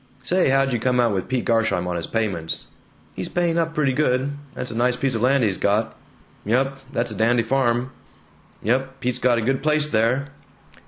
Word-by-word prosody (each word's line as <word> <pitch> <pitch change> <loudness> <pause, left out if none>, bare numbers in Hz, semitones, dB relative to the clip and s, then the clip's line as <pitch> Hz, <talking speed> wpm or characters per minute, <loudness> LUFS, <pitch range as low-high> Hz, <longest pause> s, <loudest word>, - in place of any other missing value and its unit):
"Say, 180 +4 +2
how'd 135 0 +2
you 120 - 0
come 125 +2 +1
out 120 -2 +3
with 95 -2 -2
Pete 130 -2 -1
Garsheim 115 -6 +1
on 90 - -2
his 85 - -3
payments?" 95 -8 -2 0.5
"He's - - -5
paying 170 -1 +1
up 165 -1 -1
pretty 140 -3 +2
good. 130 -1 +1 0.2
That's 125 -1 -5
a - - -6
nice 125 +1 +2
piece 130 +1 0
of 110 - -2
land 130 +1 +3
he's 100 -4 0
got." 105 +3 +1 0.5
"Yump, 135 +5 0
that's 120 -2 -1
a - - -6
dandy 115 +2 +2
farm." 125 0 +1 0.7
"Yump, 135 +4 0
Pete's 125 -1 -2
got 125 -2 +3
a - - 0
good 130 +4 0
place 150 0 +2
there." 125 +4 +1
125 Hz, 200 wpm, -22 LUFS, 115-135 Hz, 0.7 s, out